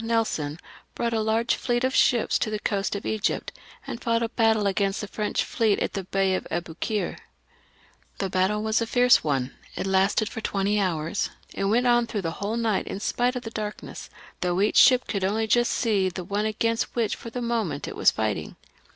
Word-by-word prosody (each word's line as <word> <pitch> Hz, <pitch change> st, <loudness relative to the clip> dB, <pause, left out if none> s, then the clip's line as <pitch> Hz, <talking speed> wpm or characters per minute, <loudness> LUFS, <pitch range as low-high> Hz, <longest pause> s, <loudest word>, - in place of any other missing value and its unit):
Nelson, 220 Hz, -10 st, -1 dB, 0.4 s
brought 235 Hz, -1 st, -1 dB
a 220 Hz, -, +1 dB
large 220 Hz, +2 st, +1 dB
fleet 240 Hz, -1 st, -1 dB
of 260 Hz, 0 st, +1 dB
ships 240 Hz, -4 st, +3 dB
to -, -, 0 dB
the 215 Hz, -, -2 dB
coast 200 Hz, -1 st, -1 dB
of 200 Hz, -, -5 dB
Egypt, 220 Hz, -2 st, -1 dB, 0.3 s
and 235 Hz, -, -6 dB
fought 230 Hz, 0 st, +1 dB
a 230 Hz, -, -1 dB
battle 220 Hz, -3 st, +2 dB
against 195 Hz, 0 st, 0 dB
the 210 Hz, -, -5 dB
French 210 Hz, +1 st, -1 dB
fleet 220 Hz, -4 st, +1 dB
in -, -, -1 dB
the 195 Hz, -2 st, -4 dB
Bay 195 Hz, 0 st, +1 dB
of 185 Hz, -, -2 dB
Aboukir. 175 Hz, +5 st, -3 dB, 1.0 s
The 195 Hz, -, -1 dB
battle 190 Hz, +3 st, +1 dB
was 220 Hz, +1 st, +1 dB
a 230 Hz, -, -1 dB
very 245 Hz, +2 st, +2 dB
fierce 250 Hz, -, +7 dB
one; 135 Hz, -4 st, -1 dB, 0.2 s
it -, -, -3 dB
lasted 195 Hz, +2 st, +2 dB
for 225 Hz, -, -6 dB
twenty 200 Hz, 0 st, 0 dB
hours, 170 Hz, -1 st, -1 dB, 0.2 s
and 195 Hz, -, -1 dB
went 240 Hz, +4 st, +2 dB
on 240 Hz, -1 st, +4 dB
through 210 Hz, -4 st, -3 dB
the 165 Hz, -, -1 dB
whole 210 Hz, +3 st, -1 dB
night 225 Hz, -4 st, 0 dB
in 195 Hz, -, -4 dB
spite 245 Hz, +4 st, 0 dB
of 250 Hz, -, -4 dB
the 225 Hz, -, -6 dB
darkness, 210 Hz, -2 st, -6 dB, 0.3 s
though 180 Hz, 0 st, 0 dB
each 205 Hz, -, +2 dB
ship 255 Hz, -1 st, +7 dB
could 200 Hz, -3 st, -2 dB
only 215 Hz, +4 st, +1 dB
just 240 Hz, +2 st, +3 dB
see 200 Hz, -5 st, +1 dB
the 180 Hz, 0 st, -6 dB
ship 205 Hz, +3 st, -1 dB
against 230 Hz, +1 st, -1 dB
which 230 Hz, -3 st, 0 dB
for 230 Hz, -, -9 dB
the 250 Hz, -, -5 dB
moment 230 Hz, -11 st, -2 dB
it -, -, -6 dB
was -, -, +5 dB
fighting. 105 Hz, -8 st, -2 dB
210 Hz, 210 wpm, -25 LUFS, 195-230 Hz, 1.0 s, fierce